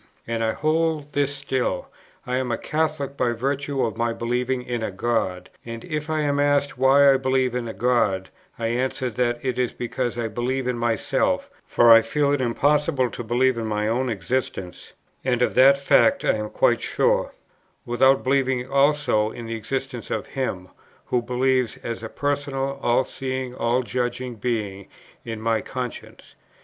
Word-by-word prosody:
And 115 -1 -2
I 110 0 +1
hold 155 -1 0
this 145 0 +1
still: 135 -2 -2 0.4
I 125 0 -1
am 130 -2 -1
a 115 - 0
Catholic 150 -3 -2
by 125 -3 +1
virtue 135 +3 -1
of 110 -1 -4
my 115 0 0
believing 125 +2 -1
in 120 -1 -3
a 110 - -2
God; 95 -3 -2
and 115 -1 -7
if 155 -2 -4
I 155 -1 0
am 145 -1 0
asked 145 -1 +2
why 135 +2 +6
I - - +3
believe 130 -1 +1
in 125 -1 -2
a 110 - -5
God, 115 -6 +1 0.3
I 115 -1 -1
answer 125 +1 -1
that 120 +1 0
it 125 -1 -1
is 125 -1 0
because 120 0 -3
I 115 -1 -1
believe 125 +4 -2
in 125 - 0
myself, 115 -2 0 0.2
for 120 -1 +6
I 115 - +8
feel 140 +5 0
it 145 - 0
impossible 140 +1 +1
to - - -6
believe 120 +2 +2
in 110 - -3
my 105 0 -1
own 125 +3 0
existence 100 -3 -4 0.3
(and 125 -2 +1
of - - +1
that 135 +2 +6
fact 275 - +3
I - - +4
am 105 -1 -3
quite - - +2
sure) - - +1 0.5
without 130 +3 +3
believing 130 -1 +1
also 140 -6 +2
in 120 +1 -8
the 115 - -4
existence 130 +2 -4
of - - -2
Him, 95 -9 -4 0.4
who 125 - +1
lives 125 0 0
as 115 -1 -4
a 110 - -6
Personal, 140 -1 -2
All 120 +2 +2
seeing, 130 -1 -4
All 125 +1 0
judging 125 0 -3
Being 105 -4 -3 0.4
in 115 -2 -5
my 110 0 0
conscience. 125 -2 -7
125 Hz, 175 wpm, -23 LUFS, 115-135 Hz, 0.5 s, I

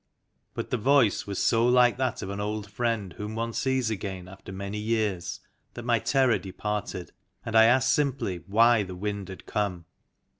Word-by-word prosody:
But - - -5
the 125 - 0
voice 125 -4 +3
was 100 -1 -4
so 115 -1 +3
like 125 -1 +5
that 130 -1 -1
of 95 - -5
an 100 - -5
old 105 0 -3
friend 110 -5 -1
whom 105 +4 -6
one 115 +1 -2
sees 130 -3 0
again 95 -3 -5
after 95 0 -11
many 100 +2 -5
years 105 -5 -1 0.3
that 120 - -7
my 120 -2 +3
terror 130 +1 +2
departed, 100 -1 -4 0.3
and 115 - -3
I 110 0 +8
asked 120 +1 +4
simply 130 -10 0
why 115 +3 +5
the 95 -2 -5
Wind 100 0 -4
had 95 - -10
come. 90 -5 -2
105 Hz, 180 wpm, -27 LUFS, 100-120 Hz, 0.3 s, I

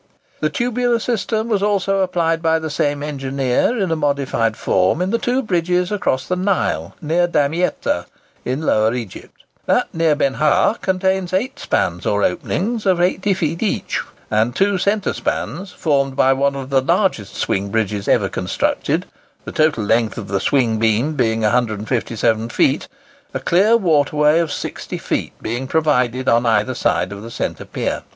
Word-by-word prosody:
The 155 - +1
tubular 245 +5 0
system 225 -1 -1
was 210 -4 0
also 195 -1 +1
applied 170 -3 0
by 160 -1 +2
the 160 -1 -4
same 145 -1 -1
engineer, 135 - 0
in 190 -5 0
a - - +2
modified 140 -7 0
form, 95 - +1
in 185 +2 0
the 230 - +1
two 255 +2 0
bridges 180 -2 0
across 130 -10 -1
the 180 - 0
Nile, 185 +1 -1
near 170 +3 +2
Damietta 160 +2 0 0.4
in 130 +5 -2
Lower 110 -4 +2
Egypt. 115 -7 -8 0.2
That - - +1
near 165 -2 +2
Benha 150 - +2
contains 190 -1 0
eight 245 +8 -1
spans 90 0 -1
or 105 0 +1
openings 210 - -1
of 185 -2 +3
80 190 +2 +1
feet 165 -2 -2
each, 220 - -1 0.3
and 110 +3 +1
two 195 -1 +2
centre 200 +2 0
spans, 190 +3 -3
formed 140 -5 0
by 135 -1 +4
one 140 +1 +1
of 135 0 -6
the 135 -1 +4
largest 170 - 0
swing 100 +1 -1
bridges 105 -1 -1
ever - - +3
constructed,—the - - -3
total 155 -7 +2
length 110 +1 +1
of 100 -4 -6
the 100 -1 0
swing 115 -1 +1
beam 115 +7 +1
being 115 -5 0
157 115 0 0
feet,—a 280 - -2
clear 205 +7 +4
water 155 -8 +2
way 150 +2 +4
of 165 -3 -1
60 - - -5
feet - - -3
being 120 +4 -3
provided 130 -5 +1
on 115 +1 +3
either 110 +3 +2
side 90 -6 0
of 100 0 -7
the 115 - -8
centre - - -4
pier. - - -3
150 Hz, 160 wpm, -19 LUFS, 120-190 Hz, 0.4 s, by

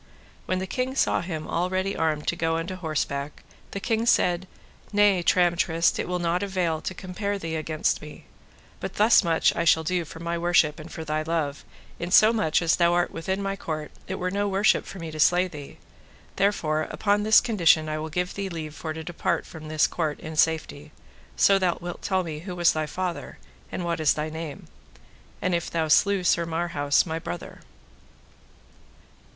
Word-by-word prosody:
When 185 - 0
the 190 - -2
king 255 +6 -3
saw - - +2
him 160 -3 -5
all 175 +2 -1
ready 190 +1 -1
armed 155 -2 -1
to - - -1
go 165 -1 0
unto 170 +3 -4
horseback, 145 -4 -3 0.3
the 200 - -5
king 225 +2 -1
said: 180 -4 +2 0.4
Nay, 205 -3 +4
Tramtrist, 170 -1 +2
it - - -2
will 180 0 -1
not 175 0 0
avail 180 -5 -1
to 185 - -5
compare 200 +3 -3
thee 165 -4 -4
against 155 0 -1
me; 150 0 -11 0.6
but - - -6
thus 220 +1 +5
much 165 -2 +2
I - - 0
shall 160 -1 +4
do 180 +1 0
for 165 - -11
my 170 0 -3
worship 170 -3 +2
and 155 +2 -10
for 160 - -6
thy 155 0 -1
love; 155 -3 -2 0.4
in 170 - -3
so 215 +4 +6
much 180 -7 +1
as 165 - +3
thou 170 -1 +3
art 175 0 +1
within 190 +4 -3
my 195 0 -2
court 155 -5 -5 0.2
it 190 - -3
were 185 0 -2
no 205 +1 0
worship 200 +2 +2
for - - -8
me 165 -3 -6
to 155 - -8
slay 175 +4 +4
thee: 150 -5 -10 0.6
therefore 155 -6 +1
upon 205 0 +1
this 215 +1 +6
condition 170 -9 +3
I 155 0 -2
will 155 +1 -4
give 180 +3 -2
thee 200 -1 -4
leave 160 -3 -6
for 155 0 -5
to 160 0 -7
depart 175 +1 -2
from 155 -1 -10
this 155 -1 +2
court 155 -4 -2
in 160 -2 -7
safety, 155 -2 0 0.4
so 195 0 +5
thou 180 -2 +1
wilt 175 0 -7
tell 190 -1 0
me 155 -3 -5
who 180 +2 -7
was 175 -1 +4
thy 155 -1 -2
father, 180 +1 -4 0.3
and 180 - -4
what 170 -1 -1
is 155 -2 +3
thy 155 +1 -3
name, 160 -2 -7 0.8
and 185 - +1
if 170 -1 -1
thou 160 -1 -1
slew 200 +4 +4
Sir 170 -1 +2
Marhaus, 165 -4 +1
my 160 -1 -3
brother. 85 - -7
170 Hz, 195 wpm, -25 LUFS, 155-185 Hz, 0.8 s, so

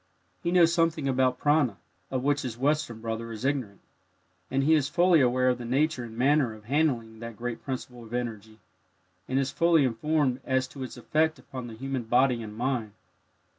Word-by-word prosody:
He - - -1
knows 170 -2 +5
something 165 -4 +1
about 130 -1 +2
"prana," 145 -7 +2 0.3
of 130 -1 -2
which 145 +1 +2
his 120 -3 -5
Western 135 -4 0
brother 115 0 -4
is 115 +3 -6
ignorant, 130 -8 -2 0.7
and 135 +1 +1
he 155 +3 +4
is 145 -2 +2
fully 175 -1 +4
aware 130 0 +3
of 125 -1 0
the - - -6
nature 135 +2 0
and 115 -1 -9
manner 130 -2 +2
of 110 -1 -16
handling 120 -5 0
that 115 -1 -8
great 120 -1 -5
principle 125 -2 -6
of 115 - -13
energy, 110 -3 -4 0.7
and 130 - -1
is 135 -1 0
fully 165 -4 +4
informed 130 +2 0
as 130 0 0
to 135 - -10
its 130 -1 -6
effect 155 +6 +1
upon 130 -2 -8
the 115 - -9
human 135 +2 -3
body 125 +1 +3
and 105 -1 -8
mind. 120 -4 -1
130 Hz, 190 wpm, -27 LUFS, 115-145 Hz, 0.7 s, knows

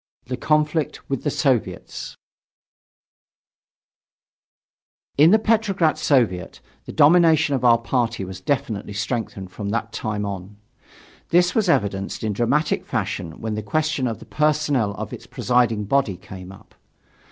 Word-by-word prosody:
THE 125 - -3
CONFLICT 150 +3 0
WITH 135 - -1
THE 145 - +1
SOVIETS 135 -5 -2 3.0
In 150 +3 +6
the 215 - +6
Petrograd 210 -7 +2
Soviet, 115 -11 +1 0.3
the - - -7
domination 160 -1 +5
of 130 -2 -1
our 120 -1 +6
party 115 -3 -1
was 95 0 -8
definitely 105 -3 -2
strengthened 105 -3 -4
from 100 +1 -5
that 115 +1 -2
time 105 -2 -3
on. 100 0 -6 0.7
This 175 +1 +3
was 215 -5 +1
evidenced 100 - 0
in 110 -1 -1
dramatic 140 +8 +1
fashion 80 -1 -4
when 110 -1 -3
the 105 - -3
question 155 +4 0
of 115 - -3
the - - -13
personnel 150 -8 +1
of - - -6
its - - -9
presiding 120 -4 +1
body 105 -4 +1
came 95 0 -10
up. 95 - -16
120 Hz, 135 wpm, -22 LUFS, 105-150 Hz, 3.0 s, In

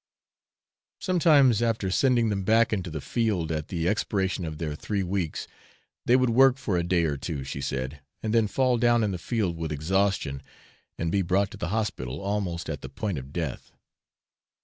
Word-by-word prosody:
Sometimes, 150 - +4
after 115 -5 0
sending 120 +1 +3
them 100 -2 -1
back 110 +3 +3
into 95 -4 -2
the 80 -2 -5
field, 100 - -1
at 75 -1 -2
the 85 -2 -2
expiration 95 -3 0
of 80 -1 -5
their 75 -2 -3
three 100 +6 -2
weeks, 90 -3 -2 0.6
they 120 - +6
would 130 -2 +3
work 135 +2 +5
for 120 -8 -2
a 85 - +2
day 85 0 +1
or 75 -3 0
two, 70 -1 -4
she 70 +1 -5
said, 65 +2 -3 0.2
and 110 -1 -1
then 115 -2 +4
fall 125 +3 +1
down 120 -1 +4
in 105 - 0
the 90 - -4
field 100 -5 -1
with 80 -2 -4
exhaustion, 80 -2 0 0.6
and 85 0 -1
be 100 - +2
brought 95 +2 +1
to - - -9
the - - -3
hospital 90 - -2
almost 100 -4 -2
at 75 -3 -4
the 65 - -7
point 90 +3 -3
of 65 +1 -11
death. 80 -5 -4
95 Hz, 190 wpm, -27 LUFS, 80-110 Hz, 0.6 s, they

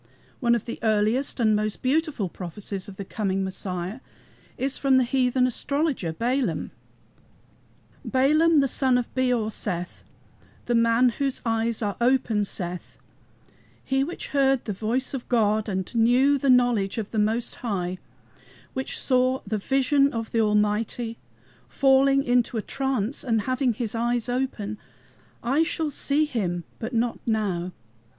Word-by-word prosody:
One 235 -3 +3
of 230 - -3
the 235 - -6
earliest 220 +5 +1
and 215 -2 +3
most 215 0 -2
beautiful 280 - 0
prophecies 190 +3 -6
of 200 - -9
the 200 - -6
coming 195 -1 -1
Messiah 190 +2 -4 0.6
is 270 +1 -1
from 270 -2 +3
the 260 - +4
heathen 250 0 +2
astrologer, 280 - -1
Balaam: 230 - -1 1.3
"Balaam 300 +4 +4
the 275 - +2
son 260 -1 +2
of 245 - -3
Beor 245 -4 +1
saith, 180 -4 -4 0.6
The 240 - 0
man 230 +2 +4
whose 270 +3 -2
eyes 225 0 0
are 205 -1 -2
open, 235 -4 +2
saith, 180 -2 -6 0.9
He 270 0 +1
which 345 +5 -6
heard 270 -2 +2
the 210 - -3
word 240 +4 +1
of 260 -3 -5
God 215 -3 +2
And 190 +1 -3
knew 250 +5 +4
the 275 - 0
knowledge 245 -6 +3
of 215 -3 -4
the 220 - -1
Most 225 +3 0
High, 185 -6 -3 0.7
Which 265 0 -3
saw 255 0 +2
the 210 +1 -2
vision 275 +4 +2
of 225 -1 -4
the 230 - +2
Almighty, 215 +2 0 0.5
Falling 275 0 +4
into 245 -2 +1
a 215 - -2
trance 265 -3 -2
and 225 -5 +1
having 255 +2 0
his 225 -2 -3
eyes 235 0 0
open: 245 -5 -2 0.6
I 270 +6 +2
shall 320 -1 -1
see 285 +2 +1
HIM, 180 - -2 0.2
but 230 +3 -5
not 235 0 0
now. 195 -6 -1
235 Hz, 145 wpm, -25 LUFS, 210-265 Hz, 1.3 s, the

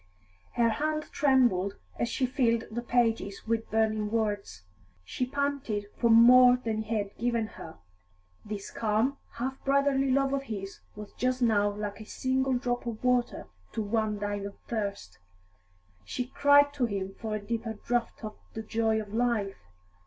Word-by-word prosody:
Her 235 -1 +3
hand 305 +6 -1
trembled 240 -9 +3 0.2
as 235 - 0
she 255 - 0
filled 235 -3 +1
the 240 +2 -3
pages 230 -5 0
with 225 0 -1
burning 215 -1 +1
words. 205 - -2 0.4
She 250 - -3
panted 280 -6 -2
for 235 - +1
more 245 +2 +8
than 225 -3 -2
he 220 +1 -3
had 200 -1 -4
given 235 -1 0
her; 165 -7 -10 0.7
this 210 -2 -6
calm, 225 +5 0 0.2
half 260 +3 -4
brotherly 275 -1 +2
love 275 +1 +2
of 275 - 0
his 200 -7 -6 0.2
was 210 0 -9
just 255 0 0
now 205 -3 +3
like 205 +1 -5
a - - -9
single 260 +3 0
drop 245 0 -2
of 230 0 -5
water 250 -1 +1 0.3
to 220 - -2
one 215 0 0
dying 205 -1 -3
of 200 - -11
thirst; 200 - -4 0.8
she 250 - -3
cried 285 +2 +4
to 260 -4 0
him 195 -2 -4
for 220 -1 -3
a - - -2
deeper 225 +2 -3
draught 235 +2 -2
of 215 -1 -7 0.2
the 220 - -4
joy 220 0 +1
of 210 -1 -7
life. 220 - -1
230 Hz, 160 wpm, -29 LUFS, 210-250 Hz, 0.8 s, more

